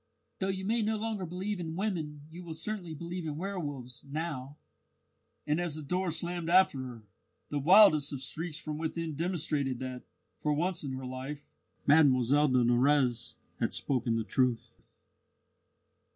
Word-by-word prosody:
Though 190 - 0
you 190 0 -2
may 230 +3 +2
no 220 +1 +1
longer 210 -4 -3
believe 185 +4 -3
in 165 -2 -4
women 165 -7 -2
you 175 +2 -9
will 165 -2 -7
certainly 175 -1 -4
believe 170 +2 -5
in 150 -1 -3
werwolves 145 -10 -5
now." 145 -2 -4 0.9
And 150 +3 +1
as 170 -4 -2
the 155 - -6
door 180 +5 0
slammed 170 +1 -3
after 180 -6 +5
her, 125 -4 -7 0.5
the 145 - -1
wildest 155 -2 +7
of 140 - -4
shrieks 155 +4 -4
from 155 -1 -5
within 165 0 -2
demonstrated 150 -5 -1
that, 130 0 -5 0.4
for 150 - +1
once 175 +3 -1
in 135 -2 -3
her 130 0 -5
life, 130 +3 -6 0.4
Mlle 140 -4 +6 0.2
de 130 -2 +3
Nurrez 120 0 +2 0.2
had - - 0
spoken 125 -4 0
the 115 - 0
truth. 125 -1 +1
155 Hz, 155 wpm, -31 LUFS, 135-175 Hz, 0.9 s, wildest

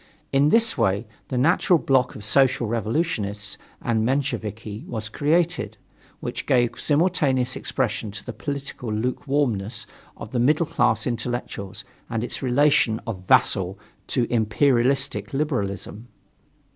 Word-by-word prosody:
In 140 +2 +4
this 230 +4 +4
way, 100 +4 +1 0.2
the 130 - -3
natural 170 +6 +4
bloc 130 -4 +1
of 105 - -7
Social 130 +1 +3
Revolutionists 110 - -2 0.2
and 110 -2 0
Mensheviki 115 -4 -2
was 110 -2 -4
created, 165 +8 0 0.4
which - - -4
gave 120 -2 +2
simultaneous 145 -6 +1
expression 110 -4 -2
to 100 0 -8
the - - -5
political 140 -5 -5
lukewarmness 115 -2 -1 0.3
of 110 - -8
the 125 - 0
middle 150 +7 +3
class - - +1
intellectuals 120 -5 -4 0.2
and 115 0 -2
its 120 - -2
relation 130 -3 +3
of 95 -6 -6
vassal 95 +1 +3 0.3
to 125 -3 +1
imperialistic 130 +4 +1
liberalism. 115 - -2
125 Hz, 120 wpm, -24 LUFS, 110-140 Hz, 0.4 s, In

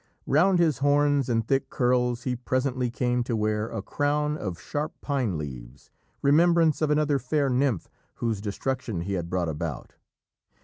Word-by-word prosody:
Round 180 +7 +4
his 160 -6 +2
horns 145 -1 +2
and 115 -2 0
thick 135 0 +1
curls 125 -1 +1
he 125 -2 -1
presently 130 0 -1
came 125 0 0
to 120 - -1
wear 105 0 0
a - - -5
crown 150 +1 0
of 95 - -5
sharp 150 +8 -3
pine 130 - -1
leaves, 65 -4 -8 0.3
remembrance 165 +2 +4
of 155 - +2
another 150 -1 +2
fair 140 +1 0
nymph 125 - +1 0.3
whose 115 -4 -2
destruction 110 -1 -3
he 100 +3 -3
had 85 -3 -3
brought 90 -1 0
about. 75 -2 -5
125 Hz, 160 wpm, -26 LUFS, 110-145 Hz, 0.3 s, Round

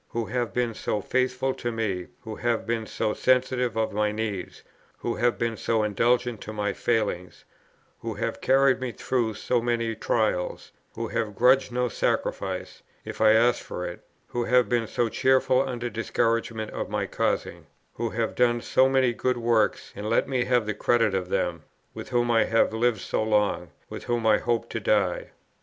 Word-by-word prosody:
who 115 -1 -2
have 120 -3 -2
been 120 +1 -1
so 105 - -2
faithful 130 +4 0
to 120 - -4
me; 100 -6 -2
who 110 -3 -7
have 120 -1 0
been 115 -1 -2
so 105 - -1
sensitive 125 -2 +1
of 110 -1 0
my 105 0 +1
needs; 105 -4 -4 0.3
who 120 - -2
have 120 +1 +2
been 115 -1 -1
so 110 0 0
indulgent 120 +2 +1
to 110 - -7
my 105 -1 -2
failings; 105 -6 -2 0.5
who - - -5
have - - -3
carried 135 0 +4
me 130 -1 -2
through 115 -3 -1
so 120 +2 0
many 115 -1 0
trials; 110 -5 -1 0.2
who 115 -1 -4
have 110 -3 -2
grudged 130 +4 +4
no 125 0 0
sacrifice, - - -2 0.2
if - - -7
I 110 0 +7
asked 120 +2 +3
for 90 - -5
it; 85 - -7 0.3
who 120 -1 -2
have 125 +1 +4
been 120 -2 0
so 120 - 0
cheerful 130 +2 +3
under 125 -3 -3
discouragements 115 -1 -1
of - - -4
my - - -1
causing; - - -2 0.3
who 115 0 -2
have 110 0 -2
done 120 -1 +2
so 130 +2 +3
many 130 -2 +3
good 125 +1 0
works, 115 -4 +1
and 105 +2 -4
let 115 - +2
me 130 -2 0
have 125 -3 +2
the 105 - -1
credit 115 0 +2
of 90 -2 -2
them; 85 -3 -1 0.3
with - - -8
whom 120 -1 +1
I 115 -1 +4
have 115 -1 +2
lived 110 -2 +1
so - - -1
long, 105 -5 +1 0.2
with - - -8
whom 120 -1 -1
I 110 -1 +5
hope 120 -1 -1
to - - -2
die. - - +1
115 Hz, 185 wpm, -26 LUFS, 110-125 Hz, 0.5 s, I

